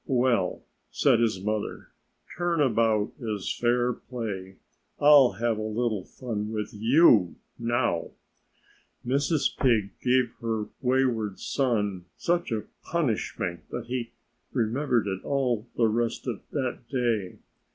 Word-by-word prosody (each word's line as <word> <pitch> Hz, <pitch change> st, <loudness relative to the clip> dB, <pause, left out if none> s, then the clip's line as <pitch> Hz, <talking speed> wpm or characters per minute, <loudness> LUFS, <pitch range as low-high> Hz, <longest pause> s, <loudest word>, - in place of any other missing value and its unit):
"Well," 120 Hz, -7 st, +1 dB, 0.3 s
said 130 Hz, -5 st, +3 dB
his 110 Hz, -5 st, 0 dB
mother. 105 Hz, 0 st, -3 dB, 0.5 s
"Turn 175 Hz, -2 st, 0 dB
about 115 Hz, -5 st, +2 dB
is 110 Hz, -6 st, -3 dB
fair 120 Hz, +1 st, +2 dB
play. 105 Hz, -7 st, -6 dB, 0.4 s
I'll 145 Hz, -3 st, +7 dB
have 115 Hz, -2 st, -1 dB
a -, -, -3 dB
little 110 Hz, -2 st, -1 dB
fun 110 Hz, -4 st, -5 dB
with 105 Hz, -1 st, -4 dB
you, 110 Hz, -, +5 dB, 0.2 s
now." 115 Hz, -8 st, 0 dB, 1.0 s
Mrs. 140 Hz, +3 st, +1 dB
Pig 110 Hz, -6 st, +2 dB
gave 125 Hz, -1 st, +2 dB
her 110 Hz, -2 st, -2 dB
wayward 125 Hz, -6 st, +1 dB
son 105 Hz, -9 st, -1 dB
such 175 Hz, -4 st, 0 dB
a 110 Hz, -2 st, -1 dB, 0.2 s
punishing 110 Hz, -, -2 dB
that 120 Hz, -, -5 dB
he 120 Hz, -1 st, -4 dB, 0.4 s
remembered 120 Hz, +1 st, +1 dB
it 95 Hz, -1 st, -3 dB
all 125 Hz, -5 st, 0 dB
the 115 Hz, -, +3 dB
rest 115 Hz, +1 st, -1 dB
of 120 Hz, -6 st, -3 dB
that 130 Hz, -3 st, -3 dB
day. 120 Hz, -7 st, -1 dB
120 Hz, 120 wpm, -27 LUFS, 105-130 Hz, 1.0 s, I'll